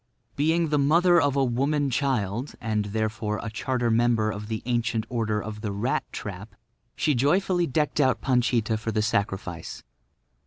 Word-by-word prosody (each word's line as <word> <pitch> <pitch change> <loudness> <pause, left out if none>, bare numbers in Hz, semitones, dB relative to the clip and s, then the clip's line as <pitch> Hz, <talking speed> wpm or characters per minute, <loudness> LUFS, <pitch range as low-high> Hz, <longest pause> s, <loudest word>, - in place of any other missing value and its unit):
Being 160 +3 +2
the 150 -1 +2
mother 170 +4 +4
of 145 -2 +1
a 140 - +3
woman 140 +3 0
child, 125 -2 -1
and 105 -2 -1
therefore 110 0 -2
a 115 - -4
charter 120 0 -1
member 115 -2 +2
of 105 0 -6
the 110 0 -4
Ancient 120 -2 0
Order 110 -3 -1
of 105 -1 -7
the 105 -3 -3
Rat 105 +6 -1
trap, 100 +1 -7 0.4
she 150 - +1
joyfully 175 +7 +2
decked 150 +2 0
out 130 -5 +3
Panchita 120 -3 +1
for 110 +1 -3
the 110 -1 0
sacrifice. 95 -6 -2
120 Hz, 160 wpm, -26 LUFS, 110-140 Hz, 0.4 s, mother